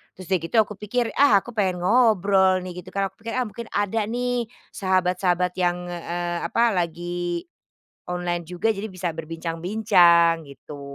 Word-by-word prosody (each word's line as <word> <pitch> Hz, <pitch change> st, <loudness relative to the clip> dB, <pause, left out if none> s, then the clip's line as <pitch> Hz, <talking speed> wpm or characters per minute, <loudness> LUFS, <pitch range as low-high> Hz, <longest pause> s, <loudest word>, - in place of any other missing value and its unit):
Terus 185 Hz, -, -10 dB
udah 185 Hz, -, +3 dB
gitu 165 Hz, +7 st, -6 dB
aku 210 Hz, 0 st, -10 dB
pikir, 230 Hz, +3 st, -1 dB
"Ah 250 Hz, -8 st, +6 dB
aku 245 Hz, -, -9 dB
pengen 190 Hz, -4 st, 0 dB
ngobrol 195 Hz, -4 st, +4 dB
nih." 180 Hz, -1 st, -7 dB
Gitu -, -, -13 dB
kan, 195 Hz, 0 st, +1 dB
aku -, -, -39 dB
pikir, 230 Hz, -, -4 dB
"Ah -, -, +2 dB
mungkin 230 Hz, +2 st, -8 dB
ada 205 Hz, +2 st, 0 dB
nih 245 Hz, 0 st, -1 dB, 0.2 s
sahabat-sahabat 180 Hz, -1 st, +1 dB
yang, 180 Hz, 0 st, 0 dB
eee, 175 Hz, 0 st, -4 dB
apa 235 Hz, 0 st, +2 dB
lagi 175 Hz, -1 st, -2 dB, 0.6 s
online 175 Hz, -1 st, -2 dB
juga, 180 Hz, +6 st, 0 dB
jadi 210 Hz, 0 st, -5 dB
bisa 185 Hz, -2 st, -3 dB
berbincang-bincang." 165 Hz, 0 st, +2 dB
Gitu, 140 Hz, +1 st, -11 dB
180 Hz, 160 wpm, -24 LUFS, 175-210 Hz, 0.6 s, Ah